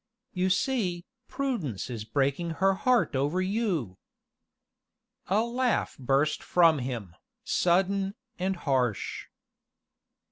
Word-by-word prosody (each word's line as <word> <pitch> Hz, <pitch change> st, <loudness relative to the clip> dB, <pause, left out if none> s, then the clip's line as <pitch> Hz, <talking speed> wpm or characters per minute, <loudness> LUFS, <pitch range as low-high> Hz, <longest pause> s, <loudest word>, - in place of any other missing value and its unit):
"You 185 Hz, 0 st, +1 dB
see, 185 Hz, -4 st, 0 dB, 0.2 s
Prudence 230 Hz, -, -3 dB
is 115 Hz, -4 st, -5 dB
breaking 140 Hz, +7 st, 0 dB
her 195 Hz, +1 st, +4 dB
heart 240 Hz, -, +2 dB
over 145 Hz, +7 st, +1 dB
you." 185 Hz, -, -1 dB, 1.3 s
A 200 Hz, +3 st, +3 dB
laugh 245 Hz, +1 st, 0 dB
burst 135 Hz, +4 st, +1 dB
from 165 Hz, -4 st, +4 dB
him, 120 Hz, -9 st, -5 dB, 0.3 s
sudden, 195 Hz, +3 st, +1 dB, 0.2 s
and 190 Hz, +1 st, 0 dB
harsh. 130 Hz, -, -1 dB
175 Hz, 100 wpm, -28 LUFS, 135-195 Hz, 1.3 s, her